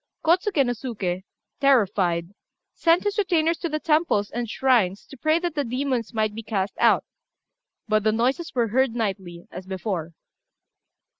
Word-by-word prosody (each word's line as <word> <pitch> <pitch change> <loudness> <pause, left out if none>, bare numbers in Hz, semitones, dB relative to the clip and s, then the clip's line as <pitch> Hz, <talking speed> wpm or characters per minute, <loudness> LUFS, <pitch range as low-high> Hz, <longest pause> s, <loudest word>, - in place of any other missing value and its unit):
Kôtsuké 340 -3 +3
no 245 - 0
Suké, 200 -7 -4 0.3
terrified, 195 -10 +2 0.4
sent 335 +1 +3
his 410 +1 -1
retainers 335 -4 +2
to 335 - -2
the 305 0 -2
temples 305 -11 +1
and 240 -1 -3
shrines 225 -7 +2
to - - -12
pray 310 +5 +2
that 345 -1 -2
the 290 -2 -1
demons 250 -1 -2
might 215 -2 0
be 225 - -6
cast 200 -3 -2
out; - - +4 0.8
but 215 -1 +2
the 215 - +3
noises 260 +10 -1
were 235 -3 +1
heard 255 +1 +1
nightly, 190 -6 -4
as 185 +1 -9
before. 185 -4 -4
235 Hz, 155 wpm, -24 LUFS, 200-305 Hz, 0.8 s, out